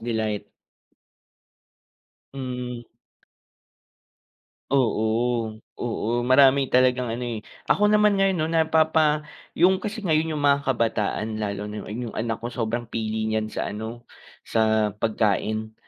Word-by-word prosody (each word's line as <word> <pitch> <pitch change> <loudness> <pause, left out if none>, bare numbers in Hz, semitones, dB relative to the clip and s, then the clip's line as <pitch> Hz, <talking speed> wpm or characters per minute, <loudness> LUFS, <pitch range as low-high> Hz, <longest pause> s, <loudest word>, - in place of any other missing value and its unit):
delight. 110 -3 -2 1.9
Mm. 125 -2 -5 1.9
Oo. 115 -2 +1 0.2
Oo, 115 -1 -2
marami 135 +1 +5
talagang 125 -1 +3
ano, 120 +2 -3
eh. 115 -3 -4 0.3
Ako 210 +1 +3
naman 210 -1 +4
ngayon 195 -1 +2
'no, 155 - +1
napapa 160 -2 +2 0.3
yung 185 +2 +4
kasi 215 +1 -4
ngayon 160 -1 +1
yung - - -4
mga 140 0 +4
kabataan 110 -3 -1
lalo 100 0 -3
na 105 0 -6
rin 120 +3 -5
yung - - -8
anak 115 0 -2
ko 120 +1 -6
sobrang 120 0 -2
pili 110 -1 -2
niyan 110 0 -1
sa - - -3
ano, 115 +3 -7 0.4
sa 110 -2 +2
pagkain. 110 0 -1
120 Hz, 120 wpm, -24 LUFS, 110-140 Hz, 1.9 s, marami